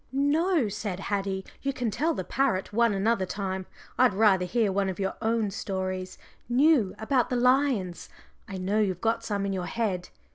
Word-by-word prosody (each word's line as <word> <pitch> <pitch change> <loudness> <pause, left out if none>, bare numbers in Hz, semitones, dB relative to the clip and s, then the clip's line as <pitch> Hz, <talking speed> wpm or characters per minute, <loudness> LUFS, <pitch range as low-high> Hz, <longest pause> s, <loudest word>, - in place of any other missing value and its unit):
"No," 290 - +2
said 200 -2 -4
Haddie, 195 -1 -2 0.2
"you 275 0 -1
can 245 -4 -2
tell 315 +9 0
the - - -3
parrot 220 -8 0
one 235 +1 +3
another 195 -1 +1
time. 190 -1 -4 0.3
I'd 250 -6 +5
rather 195 -3 +4
hear 215 +2 +1
one 195 0 0
of 190 - -5
your 195 -1 -1
own 225 -2 0
stories, 185 -2 -4 0.3
new, 255 -5 +3
about 245 +2 +1
the 255 - -1
lions. 250 -8 +1 0.4
I 195 - -6
know 195 +3 0
you've 190 -4 0
got 225 +2 0
some 205 -3 -2
in 195 - -1
your 180 -2 -3
head. 195 -6 -2
210 Hz, 180 wpm, -27 LUFS, 190-245 Hz, 0.4 s, I'd